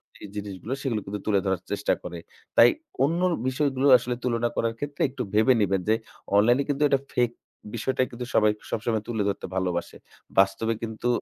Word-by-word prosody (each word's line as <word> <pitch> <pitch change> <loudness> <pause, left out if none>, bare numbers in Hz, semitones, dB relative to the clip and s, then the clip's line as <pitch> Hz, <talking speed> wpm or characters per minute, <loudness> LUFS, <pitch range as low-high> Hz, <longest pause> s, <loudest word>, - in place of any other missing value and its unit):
যেই 105 - -10
জিনিসগুলো 105 +3 -5
সেগুলো 120 -7 -1
কিন্তু 105 +1 -4
তুলে 100 -2 +3
ধরার 95 -2 0
চেষ্টা - - +1
করে। 85 -1 -6 0.4
তাই 115 - +9 0.3
অন্য 165 +5 +1 0.3
বিষয়গুলো 135 0 +1
আসলে 120 +1 -3
তুলনা 120 -1 +1
করার 115 0 0
ক্ষেত্রে 145 0 -5
একটু 130 - -4
ভেবে 110 +5 +5
নিবেন 95 -2 +1
যে 110 - +5 0.4
online 120 +5 +5
এ - - 0
কিন্তু 145 +1 +1
এটা 140 - +3
fake 120 -1 +1 0.4
বিষয়টাই 130 +3 0
কিন্তু 125 +1 -6
সবাই 105 -1 +5 0.2
সবসময় 110 -1 -1
তুলে 110 -3 -1
ধরতে 100 - -4
ভালোবাসে। 90 -2 -2 0.4
বাস্তবে 100 +4 +3
কিন্তু 110 +1 -3
115 Hz, 175 wpm, -26 LUFS, 105-130 Hz, 0.4 s, তাই